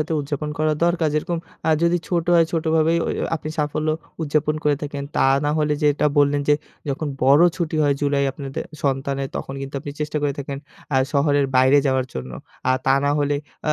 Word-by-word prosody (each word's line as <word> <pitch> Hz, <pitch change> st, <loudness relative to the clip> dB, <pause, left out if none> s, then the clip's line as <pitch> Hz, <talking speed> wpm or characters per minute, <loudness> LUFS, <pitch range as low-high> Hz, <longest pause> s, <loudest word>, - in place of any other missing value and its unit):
সাথে 160 Hz, +2 st, -2 dB
উদযাপন 145 Hz, +1 st, -4 dB
করা 155 Hz, 0 st, +2 dB
দরকার 170 Hz, -2 st, +2 dB
যেরকম 170 Hz, +3 st, -1 dB, 0.3 s
আ -, -, +5 dB
যদি 170 Hz, +1 st, +3 dB
ছোট 170 Hz, -2 st, 0 dB
হয় 165 Hz, -1 st, +5 dB
ছোটভাবেই 160 Hz, 0 st, +2 dB
ওই -, -, -1 dB
ওই -, -, 0 dB
আপনি 155 Hz, -, -7 dB
সাফল্য 150 Hz, +1 st, -1 dB, 0.3 s
উদযাপন 150 Hz, 0 st, +1 dB
করে 145 Hz, -1 st, +3 dB
থাকেন। 145 Hz, -1 st, -4 dB
তা -, -, +4 dB, 0.2 s
না 145 Hz, -, +2 dB
হলে 150 Hz, -1 st, +1 dB
যেটা 150 Hz, 0 st, +3 dB
বললেন, 145 Hz, 0 st, +3 dB
যে 145 Hz, -, +6 dB, 0.3 s
যখন 145 Hz, +2 st, -2 dB
বড়ো 140 Hz, +6 st, +6 dB
ছুটি 165 Hz, -2 st, -2 dB
হয় 145 Hz, -1 st, +3 dB
জুলাই 140 Hz, -1 st, +1 dB
আপনাদের 135 Hz, 0 st, -5 dB, 0.2 s
সন্তানের 135 Hz, 0 st, -1 dB
তখন 135 Hz, -, -5 dB
কিন্তু 135 Hz, +1 st, -7 dB
আপনি 145 Hz, -, -6 dB
চেষ্টা 150 Hz, 0 st, -2 dB
করে 145 Hz, -1 st, +1 dB
থাকেন 140 Hz, 0 st, -5 dB, 0.4 s
আ -, -, +4 dB, 0.2 s
শহরের 145 Hz, -1 st, +2 dB
বাইরে 130 Hz, +3 st, +5 dB
যাওয়ার 130 Hz, -1 st, +1 dB
জন্য। 65 Hz, 0 st, -5 dB, 0.4 s
আর 130 Hz, -, +4 dB
তা 135 Hz, -, +5 dB
না 145 Hz, -, +2 dB
হলে 145 Hz, 0 st, +1 dB, 0.3 s
আ -, -, +4 dB
145 Hz, 200 wpm, -22 LUFS, 140-155 Hz, 0.4 s, যে